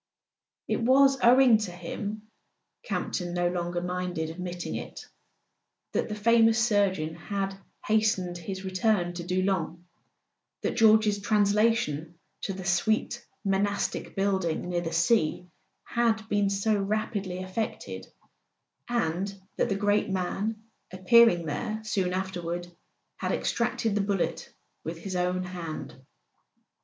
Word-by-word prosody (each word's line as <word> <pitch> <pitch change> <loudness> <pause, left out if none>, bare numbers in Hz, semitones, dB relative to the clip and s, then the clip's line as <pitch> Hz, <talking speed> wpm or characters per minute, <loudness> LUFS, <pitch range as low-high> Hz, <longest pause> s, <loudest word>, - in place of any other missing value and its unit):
It - - 0
was 270 +3 +5
owing 245 -2 +6
to 210 -4 -3
him—Campton 200 - -6
no 175 0 +2
longer 175 0 -2
minded 180 -3 -2
ad¬ - - -13
mitting 180 -1 -4
it—that - - -8
the 210 - -3
famous 225 +1 +4
surgeon 200 -9 +2
had 195 +3 -3 0.3
hastened 205 -5 +1
his 190 +3 -6
return 185 -1 +1
to 175 0 -5
Doullens, 185 -1 0 0.9
that - - -1
George's 215 -2 +5
translation 205 -6 +2 0.3
to - - -2
the 190 -1 -7
sweet 215 +6 +1 0.2
monastic 200 +1 -1
building 190 -4 0
near 175 -1 0
the 165 -1 -4
sea 165 0 +2 0.4
had 225 -2 0
been 205 -1 +2
so 200 +2 +1
rapidly 200 -2 -2
effected, 185 - -4 0.8
and 195 -5 0 0.3
that - - +1
the 195 - +1
great 205 +1 +1
man, 195 +4 -2 0.3
appearing 185 -1 +5
there 215 +9 -3
soon 195 -4 0
afterward, 175 -2 -3 0.5
had - - -2
extracted 235 -2 0
the 205 - +1
bullet 200 -2 -1 0.3
with 165 +1 -5
his 185 +2 -6
own 180 +1 0
hand. 175 -3 -6
195 Hz, 120 wpm, -28 LUFS, 175-215 Hz, 0.9 s, owing